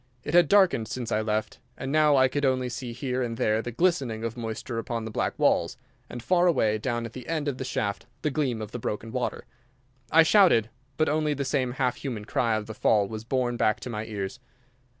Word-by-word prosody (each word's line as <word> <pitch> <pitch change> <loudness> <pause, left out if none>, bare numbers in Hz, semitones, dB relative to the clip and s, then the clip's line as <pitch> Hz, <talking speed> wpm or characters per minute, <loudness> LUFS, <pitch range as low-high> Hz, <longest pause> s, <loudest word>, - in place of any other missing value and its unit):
It 150 - -5
had 175 -2 +6
darkened 190 - +4
since 120 -2 -5
I 110 - +1
left, 110 0 -2 0.2
and 135 - -4
now 150 -1 +4
I 130 0 +5
could 145 +2 -3
only 130 -2 +1
see 120 0 -5
here 125 +1 -3
and 115 -2 -3
there 110 0 +1
the 120 - -5
glistening 130 -7 0
of 115 0 -3
moisture 115 0 -4
upon 115 -1 -4
the 110 - -5
black - - -2
walls, - - +2 0.3
and 120 -1 -7
far 180 +3 +3
away 110 -10 +2
down 120 +1 -2
at 115 - -8
the 125 -2 -9
end 155 -3 -2
of 135 -3 -2
the - - -2
shaft 100 -5 -3 0.2
the 150 - +1
gleam 130 -7 -1
of 105 - -8
the 120 - -5
broken 110 +1 -4
water. 125 0 -3 0.7
I 165 +1 +7
shouted; 160 - +4 0.3
but 155 - +2
only 150 0 +1
the 140 0 -3
same 130 -2 0
half 125 -2 0
human 115 -7 -5
cry 115 0 +1
of 110 -1 -3
the 110 - -7
fall 105 -2 +2
was 110 +1 -6
borne 120 0 -1
back 110 -2 +2
to 125 - -6
my 110 -1 -4
ears. 105 +2 -5
120 Hz, 230 wpm, -27 LUFS, 110-140 Hz, 0.7 s, I